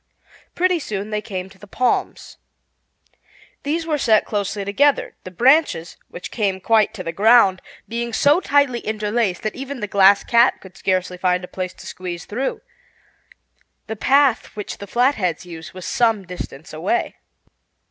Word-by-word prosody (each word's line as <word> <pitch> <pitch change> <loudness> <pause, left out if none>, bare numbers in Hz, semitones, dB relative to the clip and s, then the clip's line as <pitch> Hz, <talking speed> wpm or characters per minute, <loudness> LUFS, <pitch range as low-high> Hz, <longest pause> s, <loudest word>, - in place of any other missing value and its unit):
Pretty 365 -1 +2
soon 210 -6 -5
they 210 0 -1
came 185 -3 -5
to 190 0 -19
the 205 - -13
palms. 250 +5 -1 1.2
These 320 +3 -2
were 305 -3 -1
set 220 -4 +3
closely 205 -1 -3
together, 280 +9 +2
the - - -6
branches, 245 - +2
which 180 - -9
came 200 -4 -1
quite 215 +1 +3
to 185 - -6
the 165 - -3
ground, 200 0 +4 0.3
being 235 +1 -3
so 285 +8 +4
tightly 280 -6 +2
interlaced 215 -3 -1
that 215 - -2
even 270 0 -6
the 210 - -2
Glass 200 0 +5
Cat 235 +1 +3
could 190 -1 -15
scarcely 185 -1 -1
find 180 0 +1
a - - -6
place 185 -1 -5
to - - -13
squeeze 175 -2 -6
through. 255 +6 -3 1.2
The 220 - -5
path 270 +2 +3
which 210 -1 -6
the 200 - -8
Flatheads 215 - 0
used 165 -2 -10
was 185 -1 -9
some 225 -2 +1
distance 175 -4 -8
away. 175 +9 -1
210 Hz, 155 wpm, -21 LUFS, 185-245 Hz, 1.2 s, Glass